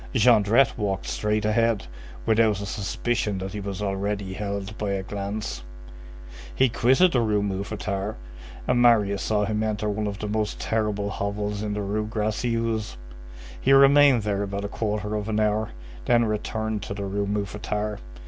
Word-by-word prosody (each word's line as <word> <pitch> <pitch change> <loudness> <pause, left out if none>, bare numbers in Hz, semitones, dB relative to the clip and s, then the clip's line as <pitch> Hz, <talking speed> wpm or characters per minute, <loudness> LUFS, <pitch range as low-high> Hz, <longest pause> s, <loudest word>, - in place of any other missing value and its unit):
Jondrette 115 +2 +4
walked 100 -2 -1
straight 105 0 -1
ahead, 115 - +2 0.4
without 110 -2 +3
a 100 - -4
suspicion 105 +1 -2
that 95 +1 -5
he 105 - -4
was 100 0 -4
already 100 0 -2
held 100 +1 -4
by 100 -2 -1
a 95 -1 -2
glance. 100 - -4 0.9
He 130 - +4
quitted 130 +11 +4
the 125 - +2
Rue 105 -2 +1
Mouffetard, 100 +1 -3 0.5
and 120 - +3
Marius 105 -5 +4
saw 105 -1 +1
him 105 0 -1
enter 105 -1 -1
one 105 0 -1
of 100 -1 -4
the 105 - -4
most 105 0 -2
terrible 105 -2 -1
hovels 105 +1 -3
in 105 -1 -2
the 105 - -2
Rue 105 +2 -2
Gracieuse; 110 - -1 0.6
he 135 - +4
remained 140 -3 +6
there 100 -1 -1
about 100 0 -3
a - - -1
quarter 105 0 -2
of 105 0 -2
an 110 0 0
hour, 105 0 +1 0.4
then 120 -1 +4
returned 110 0 -2
to 100 - -5
the 100 -1 -4
Rue 100 +1 -2
Mouffetard. 105 +1 -3
105 Hz, 165 wpm, -25 LUFS, 100-110 Hz, 0.9 s, remained